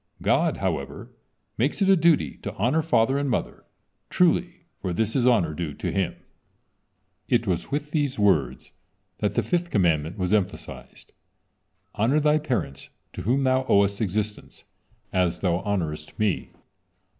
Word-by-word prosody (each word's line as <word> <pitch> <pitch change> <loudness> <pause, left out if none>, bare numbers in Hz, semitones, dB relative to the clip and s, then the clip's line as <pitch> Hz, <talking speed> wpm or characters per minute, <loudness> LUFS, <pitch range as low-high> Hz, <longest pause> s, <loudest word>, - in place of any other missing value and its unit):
God, - - +2
however, - - -4 0.5
makes 135 - 0
it 195 - +2
a 195 - +6
duty 160 - +2
to - - -6
honor 125 +10 +1
father 135 -3 +2
and 140 -1 -1
mother; - - -3 0.4
truly, 175 0 +1
for 90 -2 -3
this 110 +5 -1
is 125 -2 +3
honor 95 -11 +3
due 75 -2 -4
to - - -3
Him." 95 -3 -1 1.1
It 120 -2 +2
was 90 -4 -2
with 145 +1 -3
these 145 -4 0
words 75 - +1 0.5
that 105 - -1
the 120 - +2
fifth 175 +9 -1
commandment 85 - +1
was 90 0 -1
emphasized: 105 -4 -3 0.8
"Honor 120 +8 +2
thy 150 0 +3
parents 125 - -3 0.2
to - - -6
whom 130 +6 +1
thou 130 0 +2
owest 100 +1 +3
existence, 105 +1 -3 0.5
as 90 -2 +1
thou 85 -3 +1
honorest 85 -6 -3
Me. 105 -4 0
110 Hz, 145 wpm, -25 LUFS, 90-140 Hz, 1.1 s, a